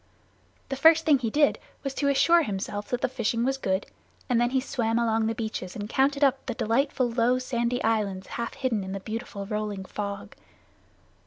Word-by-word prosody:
The 270 - -2
first 320 +4 +5
thing 295 -4 +5
he 235 -3 -1
did 290 +5 +3 0.2
was 275 -1 -3
to 280 - -1
assure 335 +5 +5
himself 205 -4 -3
that 245 0 -1
the - - +2
fishing 235 -1 -1
was 270 +1 0
good, 190 -5 0 0.4
and 240 -2 +2
then 240 - +2
he 260 +1 +1
swam 230 -3 -1
along 225 -1 +1
the 225 - -1
beaches 215 -5 -4
and 205 -1 -4
counted 275 +4 +2
up 270 -1 +3
the 245 - -2
delightful 255 +3 +1
low 240 +1 +2
sandy 245 -1 -1
islands 205 -4 0
half 235 0 -5
hidden 230 -6 -1
in 190 0 -5
the 195 - -3
beautiful 215 -1 -6
rolling 210 -2 -3
fog. 200 0 -5
235 Hz, 190 wpm, -27 LUFS, 210-265 Hz, 0.4 s, first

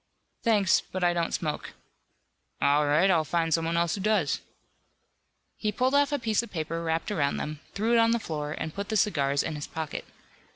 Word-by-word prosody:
"Thanks, 210 -6 +3
but 185 -1 -3
I 175 0 +4
don't 170 -1 -1
smoke." 155 -3 -3 0.9
"All 145 +1 +3
right, 165 +7 +4
I'll 165 -3 +3
find 165 +1 0
someone 165 +1 +1
else 170 -1 +1
who 200 - -3
does." 205 -7 +1 1.2
He 215 - -1
pulled 255 +5 +1
off 285 0 +4
a 290 - +1
piece 225 -4 +1
of 235 - -9
paper 165 -1 -3
wrapped 165 +4 -1
around 145 -8 0
them, 150 -1 -4 0.2
threw 220 +4 +1
it 235 - +5
on 230 0 +5
the 235 - +3
floor 150 -8 -4
and 160 0 -5
put 200 0 -5
the 220 - +1
cigars 140 -9 +2
in - - -3
his 150 -1 -5
pocket. 160 -2 -5
170 Hz, 200 wpm, -27 LUFS, 155-215 Hz, 1.2 s, it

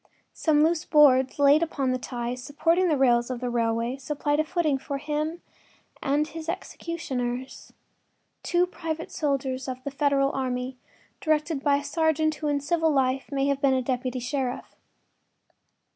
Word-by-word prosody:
Some 300 -2 +3
loose 325 0 +2
boards 265 -4 +5
laid 285 +2 +5
upon 280 -5 0
the 255 - -1
ties 245 0 -4
supporting 330 +6 +1
the 310 -4 +2
rails 240 -2 +3
of 250 -2 -3
the 250 0 -3
railway 230 +1 0
supplied 290 +2 -1
a - - +4
footing 310 -4 0
for 280 +1 -4
him 305 +4 -3 0.6
and 290 +2 +1
his 320 0 -7
executioners—two 270 +2 -4
private 325 -3 -5
soldiers 270 -3 -2
of 255 0 -5
the 280 - -4
Federal 275 -1 +2
army, 255 -1 -3 0.4
directed 305 -2 0
by 285 -1 +3
a 285 - -4
sergeant 315 0 +1
who 305 0 -4
in 290 -1 +1
civil 325 +2 +1
life 265 -1 +1
may 275 -1 0
have 280 -1 0
been 270 -2 +4
a 260 - 0
deputy 255 0 -2
sheriff. 255 0 -3
280 Hz, 155 wpm, -26 LUFS, 255-310 Hz, 0.6 s, boards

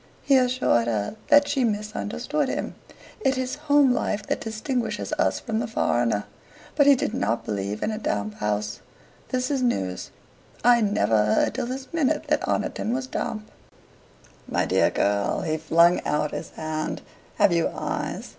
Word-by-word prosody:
He 275 - +4
assured 250 - +2
her 110 - -1
that 290 -1 +6
she 270 -3 +1
misunderstood 225 +6 -2
him. - - -3 0.5
It 265 -11 +1
is 255 0 -2 0.2
home 285 -3 +5
life 210 -4 -1
that - - -2
distinguishes 225 +2 -3
us - - +2
from 225 -3 -2
the 240 - -2
foreigner. 120 - 0 0.5
But 285 -2 +4
he 285 - +8
did - - -2
not 110 +4 -1
believe 100 0 -3
in - - 0
a 215 - -4
damp 105 - -2
home. 105 0 0 0.7
"This 255 +1 -1
is 275 -2 0
news. 95 - -1 0.5
I 240 0 +6
never 110 - +2
heard 105 - +2
till - - -3
this 260 +1 -5
minute 315 -6 +1
that - - +2
Oniton 230 - -1
was 260 0 -2
damp." 215 -4 -4 1.0
"My - - 0
dear - - +3
girl!" 100 0 0
he 155 0 -1
flung 170 +2 +4
out 150 0 0
his - - -5
hand 155 0 -4 0.3
"have 175 - +4
you 170 -1 +2
eyes? - - -4
215 Hz, 165 wpm, -25 LUFS, -, 1.0 s, he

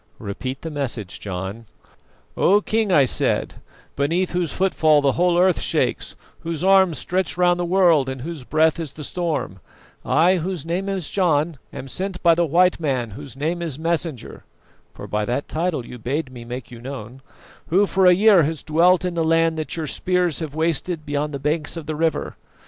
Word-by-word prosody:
"Repeat 130 +6 -6
the 165 - -5
message, 120 -10 -4
John." 100 +4 -6 0.7
"'O 200 +3 +4
King,' 215 0 0
I 145 -6 +5
said, - - 0 0.3
'beneath 165 +6 0
whose 175 -4 -1
footfall 160 -5 +3
the 140 -1 +2
whole 175 +3 +2
earth 180 0 +3
shakes, - - -1 0.2
whose 165 0 -4
arms 190 -4 +4
stretch 185 -1 -2
round 175 0 +3
the 175 - 0
world 170 -7 +3
and 130 -1 -6
whose 160 -3 -6
breath 155 +4 +2
is 155 -4 -5
the 150 - -9
storm, 160 - -3 0.4
I, 175 +4 +3
whose 175 -2 -4
name 180 +4 -2
is 190 -5 -3
John, 160 -5 +1
am 135 - -8
sent 185 +5 -5
by 170 -1 +6
the 170 0 +1
white 180 +4 +3
man 130 -7 -1
whose 135 +4 -9
name 165 +5 -2
is 160 -6 -3
Messenger' 165 -4 -3 0.5
for - - -10
by 105 0 -2
that 125 +6 -2
title 160 -6 -2
you 125 - -10
bade 130 +4 -3
me 120 -2 -10
make 125 +1 -7
you 120 -1 -10
known 130 -1 -8 0.5
'who 195 +5 +3
for 190 -1 +3
a 180 - +7
year 200 -1 +6
has 155 0 -2
dwelt 175 +4 +3
in 180 - -2
the 165 -1 0
land 165 0 +2
that 155 - -4
your 160 - -2
spears 180 +2 0
have 155 -3 -6
wasted 160 0 -1
beyond 145 0 -2
the 140 - -4
banks 150 +3 -2
of 165 - -6
the 155 +1 -4
river. 160 +1 -1
160 Hz, 190 wpm, -22 LUFS, 140-180 Hz, 0.7 s, a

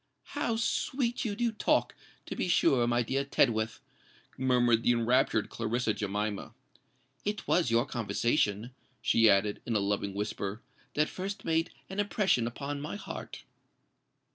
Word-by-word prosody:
"How 240 -6 0
sweet 240 +2 -1
you 205 -3 -1
do 235 +1 0
talk, 215 - +1 0.3
to - - -5
be - - -1
sure, 140 -8 +3
my 120 0 +2
dear 135 +4 -1
Tedworth!" 115 -5 +1 0.5
murmured 125 -3 +3
the 120 - +3
enraptured 120 -2 +2
Clarissa 115 0 0
Jemima. 105 0 -3 0.7
"It 210 0 -3
was 175 -7 +3
your 115 +2 +3
conversation," 115 -1 0 0.3
she 115 -1 +4
added, 100 +1 +2
in 115 - -2
a - - +4
loving 100 0 -1
whisper, 100 +1 -3 0.3
"that 150 +1 +3
first 200 +2 -5
made 165 0 +1 0.2
an 190 +2 -5
impression 195 - +2
upon 140 +4 -4
my 150 - -4
heart." 205 - -7
120 Hz, 140 wpm, -30 LUFS, 110-170 Hz, 0.7 s, she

